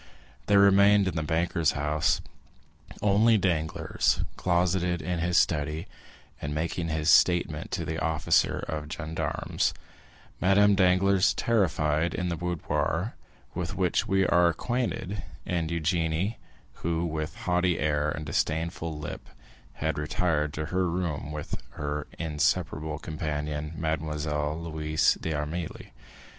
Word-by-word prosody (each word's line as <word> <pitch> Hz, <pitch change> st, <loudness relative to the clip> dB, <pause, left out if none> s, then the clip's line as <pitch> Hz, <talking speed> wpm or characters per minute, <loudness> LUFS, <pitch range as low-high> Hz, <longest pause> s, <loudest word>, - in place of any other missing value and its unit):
There 100 Hz, -, +5 dB
remained 100 Hz, 0 st, +6 dB
in 95 Hz, -, -2 dB
the 80 Hz, -, 0 dB
banker's 80 Hz, 0 st, +1 dB
house 75 Hz, +2 st, +1 dB, 0.8 s
only 105 Hz, +3 st, +5 dB
Danglars, 80 Hz, -5 st, 0 dB
closeted 90 Hz, 0 st, +1 dB
in 90 Hz, -1 st, -2 dB
his 85 Hz, +2 st, +1 dB
study, 75 Hz, 0 st, +1 dB, 0.6 s
and 75 Hz, 0 st, -3 dB
making 85 Hz, +2 st, -2 dB
his 80 Hz, -1 st, -2 dB
statement 85 Hz, -4 st, +3 dB
to -, -, -3 dB
the 80 Hz, 0 st, -3 dB
officer 80 Hz, -1 st, +1 dB
of 75 Hz, -1 st, -4 dB
gendarmes; 80 Hz, -1 st, -2 dB, 0.6 s
Madame 100 Hz, +2 st, +5 dB
Danglars, 95 Hz, +1 st, +4 dB
terrified, 80 Hz, -7 st, +1 dB
in 90 Hz, -1 st, -1 dB
the 85 Hz, -, -1 dB
boudoir 90 Hz, +3 st, -1 dB, 0.4 s
with -, -, -3 dB
which 95 Hz, +3 st, +1 dB
we 95 Hz, -2 st, +3 dB
are 85 Hz, 0 st, +4 dB
acquainted; 105 Hz, +1 st, -2 dB, 0.2 s
and 85 Hz, -2 st, -1 dB
Eugénie, 85 Hz, +4 st, 0 dB, 0.4 s
who 85 Hz, 0 st, 0 dB
with 80 Hz, -1 st, -3 dB
haughty 90 Hz, -1 st, +1 dB
air 75 Hz, -1 st, +1 dB
and 75 Hz, +1 st, -4 dB
disdainful 80 Hz, +2 st, -1 dB
lip 75 Hz, -1 st, -7 dB, 0.4 s
had 80 Hz, -1 st, -2 dB
retired 75 Hz, 0 st, 0 dB
to 80 Hz, -, -2 dB
her 90 Hz, -1 st, +2 dB
room 85 Hz, -4 st, -2 dB
with 75 Hz, -1 st, -5 dB
her 75 Hz, 0 st, -4 dB
inseparable 80 Hz, 0 st, -1 dB
companion, 75 Hz, 0 st, -4 dB
Mademoiselle 75 Hz, -1 st, -2 dB
Louise 80 Hz, -1 st, +1 dB
d'Armilly. 80 Hz, +2 st, -4 dB
80 Hz, 120 wpm, -27 LUFS, 75-90 Hz, 0.8 s, remained